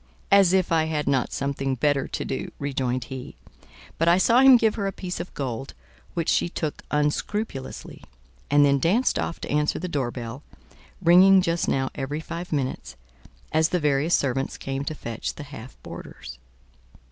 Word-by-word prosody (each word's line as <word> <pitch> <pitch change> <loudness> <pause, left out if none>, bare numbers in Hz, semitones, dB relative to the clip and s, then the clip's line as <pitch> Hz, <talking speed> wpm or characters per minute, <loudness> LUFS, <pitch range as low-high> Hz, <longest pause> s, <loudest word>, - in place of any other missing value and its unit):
"As 195 -3 +6
if 185 -2 +2
I 160 -1 +3
had 155 -2 -2
not 130 -3 +1
something 135 -1 -2
better 145 +2 +1
to - - -4
do!" 135 - -4
rejoined 130 -3 -2
he; 130 +2 -8 0.6
but 165 - +2
I 170 +1 +6
saw 230 +6 +4
him 265 -1 +8
give 220 -2 +2
her 200 -3 -2
a - - -1
piece 185 -2 -6
of - - -6
gold, 135 -1 -4 0.4
which 170 -2 -1
she - - +2
took 155 -3 -4
unscrupulously, 150 +1 -3 0.5
and 145 0 +5
then 140 -1 +3
danced 200 - +2
off 170 - -3
to - - -5
answer 150 +1 +1
the 180 - -4
door 140 -7 -1
bell, 120 +2 -7 0.6
ringing 185 +3 +7
just 170 -2 0
now 135 -1 0
every 145 +2 -4
five 170 +2 -7
minutes, 130 - -3 0.6
as 160 +1 +3
the 180 - 0
various 150 +2 +2
servants 135 -1 -1
came 135 0 -4
to 155 - -3
fetch 115 -5 -5
the 145 - -8
half 130 -3 -11
boarders. - - -10
150 Hz, 175 wpm, -25 LUFS, 135-175 Hz, 0.6 s, him